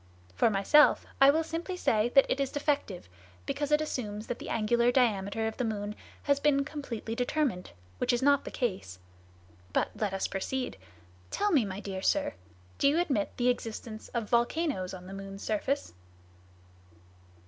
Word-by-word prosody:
For 160 - +3
myself, 215 +9 +5 0.2
I 270 - +9
will 315 +3 +3
simply 335 +3 -4
say 220 -8 +2
that 275 - +8
it - - 0
is 275 -1 0
defective, 285 - -1 0.4
because 290 0 -2
it 300 +1 +4
assumes 215 -8 -4
that 245 - -4
the - - -7
angular 235 +2 +2
diameter 220 -4 +1
of 220 - -3
the 250 - -1
moon 210 -2 -2 0.3
has 280 -1 +2
been 280 -1 +2
completely 260 -7 -5
determined, 245 -5 -1 0.3
which - - +2
is 245 +1 0
not 280 0 +4
the - - -6
case. 185 - -3 0.8
But - - +1
let 210 -3 -1
us 195 0 -1
proceed. 250 - -3 0.5
Tell 415 0 0
me, 275 - +4
my 195 0 -5
dear 195 -2 -5
sir, 290 +7 +1 0.5
do - - +4
you 300 +4 +3
admit 275 - -1
the 245 0 +2
existence 225 -2 -4
of 235 -3 -3
volcanoes 235 - 0
on 180 -1 -11
the 190 - -9
moon's 195 0 -8
surface?" 265 +7 -1
240 Hz, 170 wpm, -30 LUFS, 205-285 Hz, 0.8 s, I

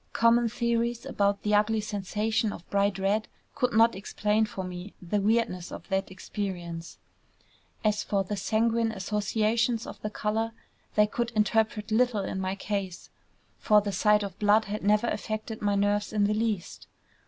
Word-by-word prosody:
Common 230 0 +4
theories 235 0 -1
about 200 0 0
the 210 - 0
ugly 210 +1 +3
sensation 215 +2 -1
of 170 - -10
bright 200 -1 +2
red 200 +3 0 0.3
could 250 -4 0
not 230 +1 +5
explain 210 +2 0
for 195 -2 -5
me 180 +2 -7
the 200 +3 -1
weirdness 205 -4 0
of - - -8
that 195 0 0
experience. 180 -3 -5 0.9
As 210 -1 +2
for 200 -1 0
the 205 +2 -3
sanguine 225 +3 +1
associations 220 +3 0
of - - -9
the 215 - -3
color, 220 +2 -1 0.4
they 210 - +6
could 235 +2 -2
interpret 215 0 +1
little 225 -2 +2
in 190 - -3
my 190 +1 -2
case; 195 -3 -4 0.5
for 210 -2 +5
the 205 0 -3
sight 210 +1 +3
of 195 -2 -7
blood 210 +1 +4
had 210 +1 -4
never 210 +3 +3
affected 215 -1 -3
my 205 -1 +1
nerves 205 +1 +1
in 210 -1 +1
the 205 +1 +2
least. 215 -4 -2
210 Hz, 165 wpm, -28 LUFS, 200-220 Hz, 0.9 s, they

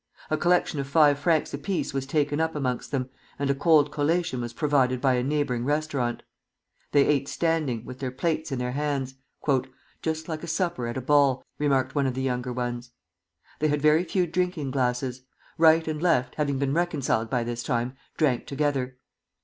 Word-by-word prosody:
A 155 - +2
collection 175 -3 +2
of 135 - -3
five 145 -1 +4
francs 160 0 +1
apiece 145 +5 -2
was 135 -1 -2
taken 145 +1 0
up 160 0 0
amongst 130 -4 -2
them, 130 -3 -2 0.3
and 140 -1 0
a - - +3
cold 150 0 +4
collation 150 -2 0
was 120 -1 -4
provided 130 -2 +1
by 130 0 +3
a 125 - +1
neighboring 135 -3 0
restaurant. 145 -4 -1 0.7
They 145 -1 +5
ate 140 -2 +1
standing, 155 -10 -1
with 130 - -9
their 135 -2 -2
plates 155 +4 -2
in 135 - -1
their 125 0 -2
hands. 140 -1 -2 0.9
"Just 160 0 -2
like 160 -2 -4
a 170 - -7
supper 170 -9 -1
at 120 - -4
a - - -2
ball," 140 -1 +3
remarked 135 -3 +1
one 140 -2 +1
of 130 - -2
the 130 - -2
younger 125 -1 -1
ones. 120 0 -3 0.7
They 155 - +2
had 150 -1 0
very 155 +3 +5
few 180 +1 0
drinking 170 -4 -1
glasses. 125 -1 -1 0.4
Right 160 0 +5
and 155 -1 -2
Left, 130 -8 +2
having 140 -3 -1
been 135 0 0
reconciled 145 -9 0
by 125 -1 0
this 120 0 -4
time, 120 +2 -1 0.2
drank 140 -6 +1
together. 140 -3 -1
140 Hz, 185 wpm, -26 LUFS, 130-155 Hz, 0.9 s, They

